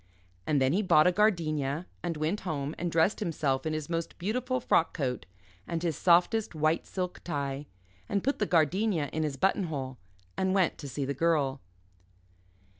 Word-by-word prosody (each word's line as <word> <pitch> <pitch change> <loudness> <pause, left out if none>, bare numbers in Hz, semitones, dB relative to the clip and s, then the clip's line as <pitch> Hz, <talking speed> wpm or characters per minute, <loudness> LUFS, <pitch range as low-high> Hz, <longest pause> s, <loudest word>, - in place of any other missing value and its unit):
And 150 -2 +3
then 130 +2 +2
he 200 - +2
bought 170 -6 +5
a 180 - +5
gardenia, 165 -6 +1 0.2
and 170 -2 -3
went 160 +7 -1
home 150 -4 -3
and 175 0 -2
dressed 165 +5 +2
himself 150 -7 -1
in 155 - -1
his 155 -2 -3
most 165 -1 -3
beautiful 250 +7 -1
frock 165 -8 +2
coat 130 -6 -2 0.4
and 165 0 -3
his 165 -3 0
softest 180 - +3
white 155 +1 +1
silk 180 -1 -4
tie, 140 -3 -3 0.4
and 200 -1 0
put 275 +3 0
the 210 - +1
gardenia 170 -1 +2
in 160 - -1
his 150 -3 -2
button 190 +5 +2
hole 130 -5 -5 0.4
and 190 0 +1
went 185 -3 +2
to 140 - -6
see 140 +1 -3
the 140 - -2
Girl. 140 -3 +1
165 Hz, 180 wpm, -29 LUFS, 145-185 Hz, 0.4 s, bought